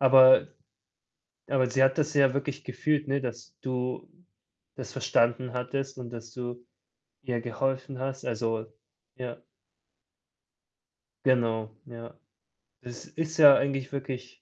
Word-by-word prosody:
Aber 130 -1 +7 1.0
aber 130 -2 +1
sie 130 +1 +2
hat 135 +2 +3
das 150 0 0
ja 135 -2 +5
wirklich 140 +1 -3
gefühlt, 150 +4 -1
ne, 140 +1 0
dass 120 -2 -7
du 125 -1 -3 0.7
das - - -7
verstanden 120 +2 +1
hattest 135 +2 -4
und, 125 -2 -7
dass 115 -1 -9
du 120 0 -7 0.6
ihr 120 -2 -2
geholfen 130 +3 -3
hast. 135 0 -4
Also 115 -1 -2 0.5
ja. 125 -2 -6 1.9
Genau, 115 -4 +1
ja. 115 -1 -10 0.7
Es 120 -1 -9
ist 160 0 -5
ja 145 -3 +10
eigentlich 135 -1 -1
wirklich 130 -2 -5
130 Hz, 120 wpm, -28 LUFS, 120-135 Hz, 1.9 s, ja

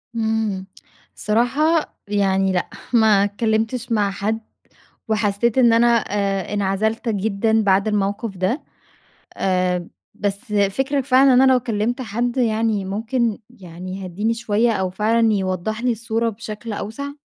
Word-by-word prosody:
إمم. 220 -4 -1 0.5
الصراحة 280 +9 +1
يعني 195 -2 +1
لأ. 180 -1 -1 0.2
ما 220 -3 +5
اتكلّمتش 220 +3 -1
مع 205 -3 +2
حد، 210 +3 -2 0.7
وحسّيت 215 +2 +1
إن 240 -3 +6
أنا 230 +1 +4 0.2
آآ 200 -1 -1
انعزلت 205 +4 -1
جدًا 220 +1 +1
بعد 195 +1 +2
الموقف 205 0 -1
ده. 190 - -1 0.8
آآ 180 -2 0 0.3
بس 205 +1 -4
فِكرَك 260 +8 +1
فعلًا 265 0 +5
إن 250 - +6
أنا 265 0 +6
لو 255 - +4
كلّمت 235 +1 -2
حد 240 +2 -2
يعني 220 -4 +1
ممكن 225 +3 -1
يعني 185 -3 -9
يهدّيني 200 +5 -1
شوية 230 0 +1
أو 190 -4 -1
فعلًا 220 +3 +2
يوضّح 190 +3 -2
لي 250 - +2
الصورة 230 0 -1
بشكل 220 +1 -7
أوسع؟ 225 +8 -5
215 Hz, 130 wpm, -21 LUFS, 200-230 Hz, 0.8 s, إن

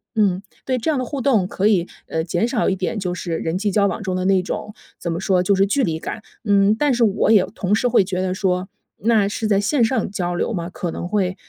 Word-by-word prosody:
嗯， 195 -4 +2 0.2
对， 260 -1 0
这 250 - -2
样 305 - +1
的 255 - -1
互 275 +3 -4
动 245 -8 +2
可 195 +2 0
以， 185 -5 +2 0.2
呃， 160 - -1
减 175 +6 0
少 240 -2 +1
一 190 - +1
点 185 +4 -2
就 185 -3 -2
是 175 -2 -3
人 165 +2 -2
际 205 +2 0
交 200 +1 +3
往 - - -3
中 190 -3 -2
的 185 - -1
那 190 0 +3
种， 210 +3 -5 0.3
怎 170 - -3
么 165 - -2
说， 185 -1 +2
就 200 - +3
是 195 0 +3
距 260 +8 +1
离 160 -3 -1
感。 220 - -6 0.2
嗯， 200 0 +4
但 285 +1 +2
是 240 - +2
我 210 -1 +2
也 200 -4 +5
同 195 +2 0
时 245 +3 +1
会 230 -5 +4
觉 185 -1 -2
得 185 -1 -1
说， 185 -1 -1 0.3
那 215 -2 +3
是 210 +2 -3
在 200 -2 +3
线 235 +6 +2
上 225 -2 +1
交 180 -2 -2
流 200 +6 -1
吗， 170 -3 -3
可 175 -1 -4
能 - - -5
会 190 -3 0
195 Hz, 280 characters per minute, -21 LUFS, 180-220 Hz, 0.3 s, 也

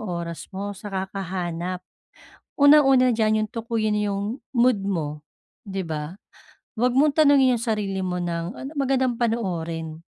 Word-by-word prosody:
oras 170 -1 -5
mo 200 +1 -5
sa 205 +1 -9
kakahanap. 185 -2 -4 0.7
Unang-una 280 -3 +6
diyan, 220 -2 +2
'yong 215 - -3
tukuyin 225 -2 -1
yung 205 +4 -2 0.2
mood 245 -2 +4
mo, 150 -6 -3 0.4
di 195 -1 -3
ba? 155 -2 -5 0.7
Huwag 245 +1 +2
mong 285 +2 +4
tanungin 275 -5 +5
yung - - -6
sarili 210 -4 -1
mo 180 -1 -2
ng, 170 +3 -3
"Anong 285 +3 -7
magandang 260 -2 +1
panoorin?" 170 -9 -2
205 Hz, 135 wpm, -24 LUFS, 175-245 Hz, 0.7 s, Unang-una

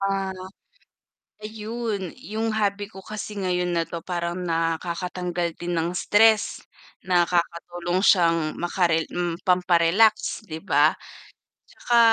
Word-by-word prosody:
Ah 195 -1 -1 1.1
ayun 215 -3 -4
yung 220 -1 -3
hobby 205 -1 -1
ko 190 - -11
kasi 215 -1 -6
ngayon 180 -1 0
na 165 - +2
'to 170 0 -6
parang 175 -1 -3
nakakatanggal 170 +1 -2
din 175 0 -4
ng 165 +2 -1
stress, 215 +3 +3 0.5
nakakatulong 175 0 0
siyang 170 -4 +5 0.2
makare 170 -2 +1 0.4
pampa-relax 180 +5 +3
'di 160 -1 -6
ba, 150 -4 +4 0.8
'tsaka, 240 -1 0
180 Hz, 105 wpm, -24 LUFS, 170-205 Hz, 1.1 s, siyang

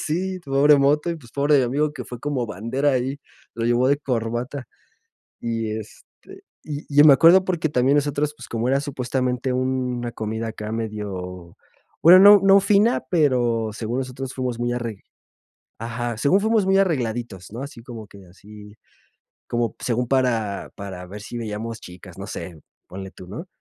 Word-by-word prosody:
sí, 185 +4 -2
pobre 140 +1 +5
moto 150 +4 +2
y, 170 - -3
pues, 120 -7 -16
pobre 145 +1 +3
mi 130 - +3
amigo, 145 +5 0
que 130 -4 -7
fue 125 0 -9
como 135 -5 -2
bandera 115 +8 -1
ahí, 130 +2 -1 0.4
lo 115 0 -3
llevó 120 +2 +2
de 140 - +3
corbata. 125 0 -3 0.8
Y, 115 -1 -2
este, 110 -1 -12 0.2
y 150 -1 -6
y 145 - -6
yo 145 - +8
me 150 - +9
acuerdo 170 +7 +6
porque 175 -4 -1
también 135 0 +2
nosotros, 145 0 0
pues, - - -11
como 115 +1 -2
era 135 +1 +2
supuestamente 130 -2 -2
una 125 -2 -2
comida 110 +1 -4
acá 110 -1 -6
medio, 95 -6 -5 0.5
bueno, 175 +3 +9
no 205 0 +9
no 195 0 +6
fina, 205 +4 +3
pero 120 -8 +2
según 115 +4 -4
nosotros 130 0 -5
fuimos 125 -3 -3
muy 120 0 0
arreg 115 -4 -4 0.8
ajá, 120 0 -4
según 145 - +3
fuimos 220 -1 +2
muy 195 0 +3
arregladitos, 120 - -2
¿no? 120 +4 -6
Así 140 -4 -9
como 115 -4 -9
que 100 -2 -15
así, 105 +3 -14 0.7
como 120 -1 -2
según 125 0 -1
para 115 -6 0
para 95 -2 -8
ver 105 +3 -9
si 110 - -8
veíamos 115 0 -5
chicas, 90 0 -12
no - - -6
sé, 85 -3 -7 0.3
ponle 95 +1 -8
tú, 90 -1 -13
¿no? 120 - -7
125 Hz, 175 wpm, -22 LUFS, 110-145 Hz, 0.8 s, me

